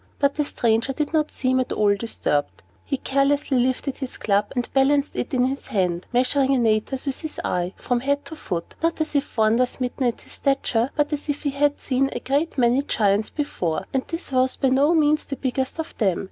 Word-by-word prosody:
But 280 -1 +2
the 295 - -1
stranger 230 0 +1
did 300 +3 -2
not 305 -1 +2
seem 260 0 0
at 255 - -1
all 205 -1 +3
disturbed. 195 - -2 0.2
He 275 - -2
carelessly 275 0 +1
lifted 260 +2 0
his 265 -2 -5
club, 205 0 +1
and 245 -1 -1
balanced 280 +1 +2
it - - -3
in 250 -2 +2
his 270 +2 -3
hand, 180 -3 -1
measuring 265 +2 +2
Antaeus 235 +3 +1
with 275 -2 -1
his 315 -2 -6
eye, 180 +1 -1
from 245 -1 0
head 280 +3 -1
to 320 - -7
foot, 175 - -5
not 330 0 0
as 315 -1 -2
if 285 -3 -1
wonder 225 +3 +4
smitten 250 +1 -2
at 235 - -2
his - - -14
stature, 265 -3 +1
but 295 0 +1
as 295 +1 -4
if 290 - -2
he 285 - 0
had 290 +1 +1
seen 270 0 +1
a - - -3
great 285 +5 -1
many 245 +1 +3
Giants 210 -6 +1
before, 180 - -2
and 265 - +2
this 330 -3 -6
was 260 0 +2
by 270 - +1
no 280 +6 +4
means 305 -1 +3
the 275 - -4
biggest 260 +1 -2
of 320 - -5
them. 195 -6 +2
265 Hz, 215 wpm, -23 LUFS, 235-285 Hz, 0.2 s, wonder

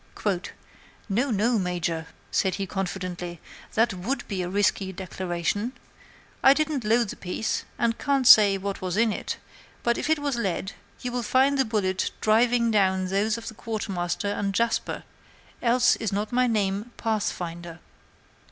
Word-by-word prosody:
"'No, 240 +8 +1
no, 225 +1 +2
Major,' 175 -3 -2 0.2
said 190 -1 +1
he, 195 - -2
confidently, 180 -3 -4 0.4
'that 225 -1 +3
would 245 +9 -3
be 195 -3 -2
a 175 - -3
risky 195 0 +1
declaration. 185 +4 -3 0.7
I 270 - +7
didn't 305 -4 0
load 225 +1 +2
the - - -5
piece, 190 +4 -3
and 230 -1 +1
can't 275 -2 +1
say 205 -4 +8
what 195 +1 -4
was 185 +1 -2
in 225 -1 +3
it; - - -4 0.5
but 235 0 +1
if - - -2
it 315 - +4
was 285 -4 -2
lead, 195 -3 -2 0.3
you 250 - -2
will 245 0 -1
find 260 +5 +3
the 265 - +4
bullet 195 -4 0
driving 235 +2 +3
down 190 -3 +2
those 210 +4 +1
of 230 - -8
the - - -5
Quartermaster 200 -4 -3
and 200 -1 -2
Jasper, 235 0 0 0.6
else 240 0 +4
is 220 - -2
not 205 +2 -2
my 250 +1 +3
name 210 +1 -1
Pathfinder.' 175 -6 -3
210 Hz, 155 wpm, -26 LUFS, 190-235 Hz, 0.7 s, say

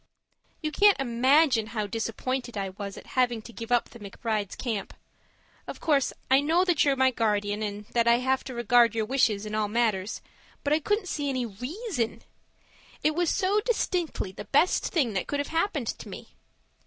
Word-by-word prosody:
You 305 - -1
can't 405 +3 +5
imagine 260 -1 +3
how 215 -2 -3
disappointed 230 +3 -3
I 195 -1 -2
was 200 +1 -7
at - - -11
having 245 -3 +1
to 235 - -11
give 230 +1 -8
up 240 -1 +2
the 235 - -12
McBrides' 205 0 -3
camp. 220 -6 -4 0.7
Of - - -7
course 285 -4 +2 0.2
I 265 +1 +6
know 330 +5 +2
that 350 -5 +3
you're 280 -2 +3
my 260 0 +3
guardian, 210 -3 0
and 210 0 -4
that 235 -1 +2
I 235 - +6
have 260 +2 0
to 260 - -7
regard 235 -1 +4
your 220 -1 0
wishes 215 -4 +1
in 215 - -6
all 215 -1 +1
matters, 210 -3 0 0.4
but 285 - +1
I 310 - +3
couldn't 415 +5 0
see 290 -4 -2
any 255 -2 -1
REASON. 250 - -4 0.8
It 305 - +3
was 345 +1 +1
so 400 +3 +2
distinctly 355 - -1
the 205 +2 -9
best 320 +6 +2
thing 270 - 0
that 190 - -2
could 285 - -2
have 285 - -2
happened 325 - 0
to - - -6
me. - - -9
245 Hz, 190 wpm, -27 LUFS, 215-295 Hz, 0.8 s, I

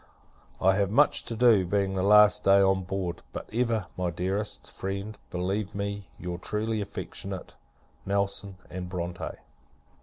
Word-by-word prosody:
I 95 +1 +4
have 100 -2 +2
much 145 +8 +3
to 115 - -4
do, 115 -4 +5
being 95 +1 0
the 95 - 0
last 105 +1 +6
day 100 0 +6
on 95 -1 +4
board; 90 -2 -3
but - - -6
ever, 115 -4 +1
my 90 -1 -1
dearest 95 +5 -3
friend, 100 +3 -4
believe 95 +3 -2
me 100 -2 -4
your 90 0 -5
truly 110 +3 -1
affectionate 95 -2 -5 0.5
NELSON 100 -1 -1
& 95 - -4
BRONTE. 90 -1 -4
100 Hz, 145 wpm, -28 LUFS, 95-105 Hz, 0.5 s, last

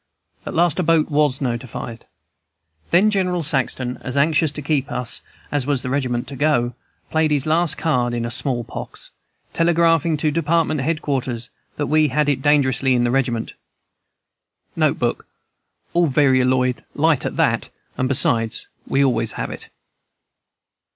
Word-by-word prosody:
At - - -5
last 170 0 +2
a - - +3
boat 165 -1 +2
was 145 -2 +2
notified. 120 -2 -5 0.8
"Then 195 +5 +4
General 180 -4 0
Saxton, 130 -4 -2
as 130 +2 -5
anxious 155 +1 +3
to 150 - -6
keep 145 -1 -1
us 125 -2 -2 0.3
as 145 -3 -1
was 140 -3 0
the 125 - -3
regiment 125 -3 -1
to 140 - -7
go, 130 -4 +1 0.4
played 160 0 +2
his 145 -2 0
last 165 +1 +1
card 125 -7 0
in 120 0 -2
small 120 -1 -1
pox, - - -9 0.4
telegraphing 165 -1 +2
to 150 0 +1
department 160 -1 +1
head 155 +3 -1
quarters 125 -4 -3 0.3
that 145 - -1
we 155 +1 +3
had 150 +2 +1
it 140 -2 0
dangerously 135 -3 +3
in 120 - +2
the 120 - +1
regiment. 120 -3 -1 1.2
(N. - - +2
B. - - +1 0.8
All 175 -1 +3
varioloid, 130 -2 +2
light 155 -2 +2
at - - -4
that, - - +1 0.3
and 130 - 0
besides, 115 -4 +2 0.2
we 135 +1 +2
always 115 -4 +1
have - - -4
it.) - - -8
140 Hz, 150 wpm, -21 LUFS, 125-155 Hz, 1.2 s, Then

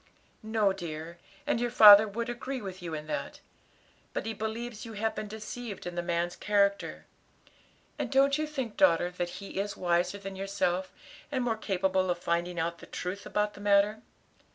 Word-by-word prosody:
"No, 215 -3 +1
dear; 170 -2 -7 0.3
and 245 -5 0
your 240 - +1
father 215 -2 +10
would 230 +3 -3
agree 255 +2 -4
with 190 -4 -7
you 165 -2 -4
in 150 0 -6
that. 155 - -4 0.7
But - - -3
he 225 - -2
believes 220 +1 -5
you 230 - -8
have 220 +1 -1
been 215 - -5
deceived 220 0 -7
in 175 - -4
the 175 - -2
man's 175 0 -1
character; 200 -1 +1 0.9
and - - -2
don't 275 +1 +4
you 310 - -1
think, 265 -8 -4
daughter, 180 - +4
that 175 -1 -3
he 195 +1 -7
is 200 0 -3
wiser 175 +2 +1
than 195 -1 -7
yourself, 190 -1 -1 0.4
and 260 -3 0
more 235 -2 0
capable 190 -3 0
of 175 - +1
finding 175 0 -1
out 170 +1 -2
the - - -12
truth 185 +3 -5
about 210 0 0
the 205 - -12
matter?" 205 +1 +3
200 Hz, 180 wpm, -29 LUFS, 180-220 Hz, 0.9 s, father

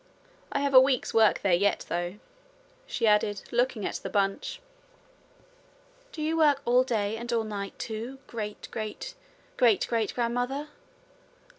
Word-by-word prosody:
I - - 0
have 280 -1 0
a 260 - +11
week's 260 -1 +2
work 225 -1 +4
there 195 -3 +3
yet, 200 +3 +2
though,' 175 +2 -2 0.7
she - - -1
added, 210 -1 +2
looking 240 -3 0
at - - -2
the - - -6
bunch. 200 - -1 1.5
'Do 310 - -5
you 320 +1 0
work 295 -4 +4
all 245 +1 +5
day 220 -4 -1
and 235 +1 -5
all 230 -1 +1
night, 200 -2 -5
too, 230 +4 -5
great 210 -3 -6
great 215 -1 -5 0.4
great 230 -5 +4
great 225 -3 -1
grandmother?' 245 +5 -1
230 Hz, 145 wpm, -28 LUFS, 210-255 Hz, 1.5 s, a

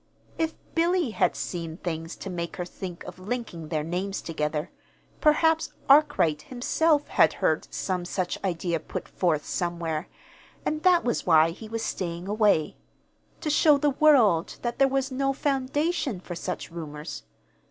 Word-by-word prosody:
If 320 -1 0 0.2
Billy 340 -4 +2
had - - +1
seen 165 -2 -4
things 165 -2 -4
to 195 - -7
make 170 -1 -4
her 180 - -4
think 180 -1 -7
of - - -10
linking 190 -6 -5
their 155 -1 -1
names 185 +5 -2
together, 150 0 -2 0.5
perhaps 320 +1 +3
Arkwright 220 - +4
himself 295 - +1
had - - +4
heard - - 0
some 185 -2 -2
such 180 +1 -3
idea 170 -2 -1
put 155 - -6
forth 160 -5 0
somewhere, 170 -3 -2 0.6
and 305 0 -1
that 360 -1 +5
was 240 -5 -1
why 160 -1 +6
he 215 +5 -10
was 225 0 -3
staying 175 0 -3
away 205 -7 +2 0.6
to 305 - -1
show 300 0 +5
the 290 +1 +2
world 255 - +4
that 240 -1 -3
there 275 - +6
was 270 0 -1
no 275 +1 0
foundation 285 - -1
for 180 - -7
such 170 - -5
rumors. 155 -2 -7
195 Hz, 150 wpm, -26 LUFS, 170-275 Hz, 0.6 s, why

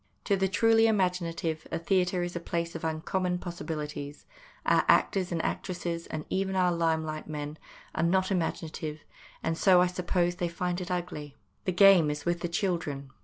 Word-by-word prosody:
To 200 - +2
the 190 0 +1
truly 225 +3 +4
imaginative 175 -6 0
a - - 0
theatre 180 +1 +1
is 175 0 -4
a - - -1
place 170 0 -3
of 165 - -7
uncommon 180 +3 -1
possibilities; 150 -4 -6 0.4
our - - +4
actors 185 -2 +3
and 170 - -1
actresses, 170 -2 -3
and 155 -1 -5
even 190 0 -1
our 180 -1 +3
lime 165 -2 +1
light 155 0 -5
men, 150 0 -5 0.3
are - - -1
not 185 +3 +2
imaginative, 160 -3 -2 0.4
and 165 - 0
so, 185 +1 +5
I 180 - +5
suppose, 175 -1 0
they 175 -1 -1
find 180 +1 -2
it 180 - -5
ugly. 170 -5 -4 0.3
The 185 - +1
game 185 -4 +7
is 150 -1 -4
with 175 0 +1
the 175 - -3
children. 165 -7 -2
175 Hz, 175 wpm, -29 LUFS, 160-185 Hz, 0.4 s, game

